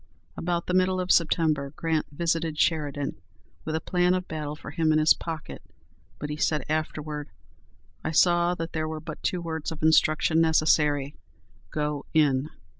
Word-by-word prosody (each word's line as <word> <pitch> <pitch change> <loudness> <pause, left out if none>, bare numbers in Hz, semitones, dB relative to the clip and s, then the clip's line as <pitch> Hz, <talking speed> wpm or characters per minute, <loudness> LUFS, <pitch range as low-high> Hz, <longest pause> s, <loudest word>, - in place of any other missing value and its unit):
About 170 0 -2
the 180 - -2
middle 185 0 +2
of 185 0 0
September 155 -4 +2
Grant 160 -2 -1
visited 165 0 -1
Sheridan 145 - 0 0.4
with 155 - -2
a - - +1
plan 180 +2 +1
of 185 0 -3
battle 150 -1 -4
for - - -9
him 160 -2 +1
in 155 - +4
his 155 0 +6
pocket, 160 -2 -7 0.6
but 150 0 -5
he 150 - -4
said 150 -2 0
afterward, 150 -1 -3 0.7
"I - - -1
saw 175 +2 +3
that 165 -1 -5
there 155 -1 -1
were 155 0 -4
but 155 0 -8
two 180 - -1
words 160 -2 -4
of 160 -1 -7
instruction 160 +1 +4
necessary, 150 -3 +2 0.6
'Go 150 +1 -3
in.' 145 -2 +3
155 Hz, 165 wpm, -26 LUFS, 150-165 Hz, 0.7 s, his